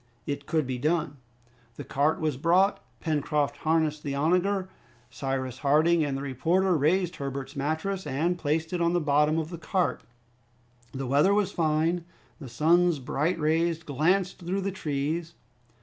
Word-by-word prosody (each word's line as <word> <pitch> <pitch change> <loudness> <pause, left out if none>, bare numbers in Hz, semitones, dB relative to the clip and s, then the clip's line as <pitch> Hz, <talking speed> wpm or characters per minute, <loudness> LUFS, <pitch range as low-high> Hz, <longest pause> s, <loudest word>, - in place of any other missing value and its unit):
It 140 0 -4
could 155 -2 +1
be 130 -1 -3
done. 155 +1 0 0.6
The - - -7
cart 145 +3 +1
was 155 -3 0
brought. 175 +8 +2 0.2
Pencroft 150 -2 0
harnessed 155 -1 0
the 140 -1 -3
onager. 180 +6 +1 0.4
Cyrus 130 -1 -3
Harding 155 +3 +3
and 140 -2 -1
the 135 - -5
reporter 170 +8 +1
raised 175 +4 +1
Herbert's 135 -1 -5
mattress 160 +7 -2
and 165 +7 0
placed 160 +1 -1
it 175 - -1
on 170 0 +2
the 175 - +3
bottom 150 0 +2
of 160 +1 -3
the 170 - -6
cart. 180 +3 -1 0.9
The 135 0 -4
weather 145 +10 +3
was 205 -2 +1
fine. 165 +1 +1 0.4
The 135 -5 -9
sun's 170 +6 +3
bright 150 +6 -1
rays 165 +2 +1
glanced 175 +7 0
through 185 +2 -2
the 195 +1 -2
trees. 160 0 -3
155 Hz, 155 wpm, -27 LUFS, 145-175 Hz, 0.9 s, Harding